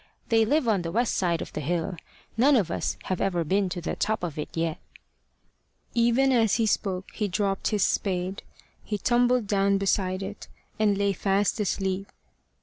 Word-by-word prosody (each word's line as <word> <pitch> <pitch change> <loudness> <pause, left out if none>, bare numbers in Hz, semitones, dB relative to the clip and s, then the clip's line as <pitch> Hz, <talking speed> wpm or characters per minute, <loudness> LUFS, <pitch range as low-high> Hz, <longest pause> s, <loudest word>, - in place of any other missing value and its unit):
They 225 -1 +4
live 285 +2 +1
on 205 -5 +2
the 165 -1 -4
west 235 +4 +1
side 170 -3 0
of - - -12
the 150 - -3
hill. 170 +4 -1 0.4
None 270 +5 +5
of 195 -9 +1
us - - -2
have 185 - -2
ever 175 -3 +1
been 190 +4 +1
to 180 0 -4
the - - -3
top 215 -1 -1
of 160 -4 -4
it 150 - -4
yet." 165 -1 -1 1.1
Even 240 +3 +3
as 225 -5 +3
he 225 - +2
spoke, 195 -3 -1
he 210 - -1
dropped 195 0 -1
his 210 -3 +1
spade. 185 0 -1 0.4
He 210 - -3
tumbled 245 +1 +2
down 200 0 +2
beside 190 -1 0
it, 200 +2 -7 0.3
and 205 -2 +3
lay 200 0 +1
fast 195 +3 +1
asleep. 195 -1 -1
200 Hz, 180 wpm, -26 LUFS, 185-220 Hz, 1.1 s, None